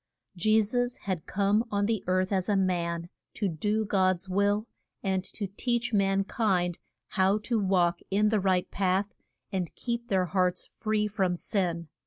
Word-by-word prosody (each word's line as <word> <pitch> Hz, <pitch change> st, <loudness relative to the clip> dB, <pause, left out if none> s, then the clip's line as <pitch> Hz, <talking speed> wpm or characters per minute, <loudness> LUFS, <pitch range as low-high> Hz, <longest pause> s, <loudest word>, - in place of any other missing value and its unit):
Je 215 Hz, +5 st, +4 dB
sus 245 Hz, +3 st, -1 dB
had 185 Hz, -5 st, -3 dB
come 205 Hz, +2 st, +2 dB
on 205 Hz, -1 st, +1 dB
the 220 Hz, -1 st, 0 dB
earth 185 Hz, +1 st, +1 dB
as 190 Hz, 0 st, 0 dB
a 205 Hz, -, +3 dB
man 170 Hz, -3 st, 0 dB, 0.3 s
to 205 Hz, -, 0 dB
do 210 Hz, +6 st, 0 dB
God's 185 Hz, -2 st, +2 dB
will, 200 Hz, +3 st, +1 dB, 0.4 s
and 190 Hz, -2 st, 0 dB
to 205 Hz, -, -5 dB
teach 235 Hz, +4 st, -1 dB
man 195 Hz, -1 st, +3 dB
kind 185 Hz, -5 st, 0 dB, 0.3 s
how 190 Hz, +2 st, +3 dB
to 220 Hz, +2 st, -1 dB
walk 180 Hz, -3 st, +2 dB
in 210 Hz, +2 st, +3 dB
the 215 Hz, -1 st, +2 dB
right 185 Hz, -2 st, +1 dB
path 195 Hz, +1 st, 0 dB, 0.4 s
and 185 Hz, -4 st, -3 dB
keep 235 Hz, -1 st, -3 dB
their 190 Hz, -4 st, +2 dB
hearts 180 Hz, 0 st, 0 dB
free 215 Hz, -1 st, +1 dB
from 195 Hz, -4 st, 0 dB
sin. 170 Hz, -3 st, -1 dB
195 Hz, 165 wpm, -28 LUFS, 185-210 Hz, 0.4 s, Je